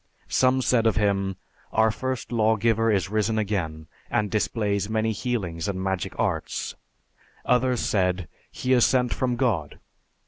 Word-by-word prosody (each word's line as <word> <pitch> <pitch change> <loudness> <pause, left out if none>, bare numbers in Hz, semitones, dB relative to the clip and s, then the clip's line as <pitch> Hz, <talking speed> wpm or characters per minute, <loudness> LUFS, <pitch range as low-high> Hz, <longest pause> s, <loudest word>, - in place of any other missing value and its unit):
Some 130 0 +3
said 115 -3 +3
of 110 - +2
him, 100 -2 +1 0.4
'Our 110 0 +3
first 130 +2 -4
law 110 -1 +3
giver 115 +1 +2
is 95 -2 0
risen 110 +1 +1
again, 90 -7 -2 0.2
and 105 -1 0
displays 105 -2 0
many 110 0 +1
healings 100 -8 -3
and 95 -2 -2
magic 95 -2 -2
arts. - - -1 0.7
Others 125 0 +2
said, 90 -3 0 0.2
'He 130 - -1
is 120 -2 +5
sent 125 -2 +3
from 125 -2 0
God.' 110 - -1
110 Hz, 145 wpm, -25 LUFS, 95-120 Hz, 0.7 s, is